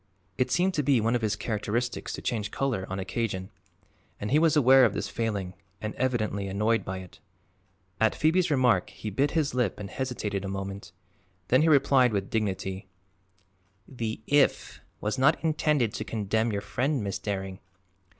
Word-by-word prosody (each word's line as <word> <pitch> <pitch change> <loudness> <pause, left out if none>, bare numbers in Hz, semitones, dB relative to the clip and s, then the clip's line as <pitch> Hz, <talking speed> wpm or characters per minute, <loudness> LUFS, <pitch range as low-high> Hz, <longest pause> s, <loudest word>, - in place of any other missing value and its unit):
It 125 - 0
seemed 185 +2 +2
to 150 - +1
be 140 -3 +3
one 115 +2 +1
of 120 - +1
his 110 -2 0
characteristics 115 +2 -2
to - - -6
change 110 -3 -2
color, 120 -7 -2
on 95 - -3
occasion, 95 -1 -3 0.7
and 105 - -4
he 150 - +5
was 160 -1 +3
aware 135 -2 +7
of 115 -5 +3
this 100 - -2
failing 100 -5 -2 0.3
and 110 -1 -4
evidently 110 -6 -1
annoyed 105 +4 +1
by 95 0 -4
it. 90 - -14 0.8
At 110 0 +3
Phoebe's 170 +3 +2
remark 125 -10 +3
he 105 - -7
bit 140 +9 +1
his 150 -3 +1
lip 125 -7 0
and 100 -1 -7
hesitated 110 -7 -3
a - - -4
moment. 95 0 -5 0.6
Then 130 +3 +5
he 160 - +4
replied 135 -4 +4
with 100 -1 -2
dignity: 95 -3 -2 1.0
"The 115 -4 -4
'if' 145 -1 +2 0.2
was 105 +5 -2
not 145 +5 +4
intended 150 -7 +1
to - - -3
condemn 110 +1 -1
your 100 -1 -2
friend, 130 +5 -1
Miss 100 -1 -3
Daring. 95 -1 -4
110 Hz, 170 wpm, -27 LUFS, 100-130 Hz, 1.0 s, aware